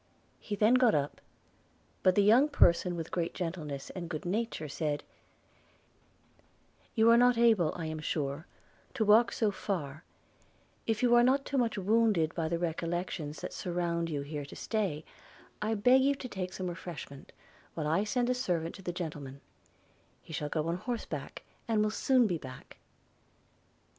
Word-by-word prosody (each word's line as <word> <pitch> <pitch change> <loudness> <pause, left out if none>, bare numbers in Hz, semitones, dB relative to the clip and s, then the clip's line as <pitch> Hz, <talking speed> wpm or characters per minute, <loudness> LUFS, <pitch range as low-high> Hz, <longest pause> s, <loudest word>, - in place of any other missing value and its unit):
He 210 - -4
then 215 +4 +4
got 250 -3 +5
up; 145 0 -2 0.8
but 185 -1 +4
the 205 - +4
young 240 +8 +5
person 175 -9 +3
with 165 -1 -5
great 170 -2 -2
gentleness 160 -6 -5
and 175 -3 -6
good 155 -1 -5
nature, 205 -3 -2
said, 145 0 -2 1.9
'You 225 0 +5
are 235 - +7
not 245 0 +5
able, 220 -9 +4
I 170 - -4
am 155 0 -4
sure, 150 0 -3 0.5
to 220 - +1
walk 220 +3 +6
so 215 -3 +1
far 160 -7 -4 0.4
– - - -36
if 225 +1 0
you 240 -1 +4
are 240 - +7
not 265 +3 +3
too 275 - 0
much 230 -3 0
wounded 205 -5 +2
by 160 -2 -2
the 170 - 0
recollections 170 -2 -3
that - - -5
surround 170 -1 -2
you 145 -3 -2
here 145 0 -5
to 140 - -11
stay, 190 -9 -2 0.6
I 220 +1 0
beg 250 +6 +5
you 280 +1 +3
to 265 - -7
take 185 -5 -5
some 185 - -5
refreshment, 170 -5 -7 0.4
while 155 - -3
I 160 +6 +2
send 240 +3 0
a 250 - +2
servant 175 -10 -2
to 195 - -11
the 180 - -3
gentleman; 150 -6 -6 0.8
he 160 - -11
shall 150 0 -3
go 155 0 -1
on 170 +1 -1
horseback, 185 - -5 0.2
and 220 -2 +2
will 215 - 0
soon 255 +2 +3
be 175 -6 -1
back.' 130 -2 -11
180 Hz, 170 wpm, -31 LUFS, 160-225 Hz, 1.9 s, are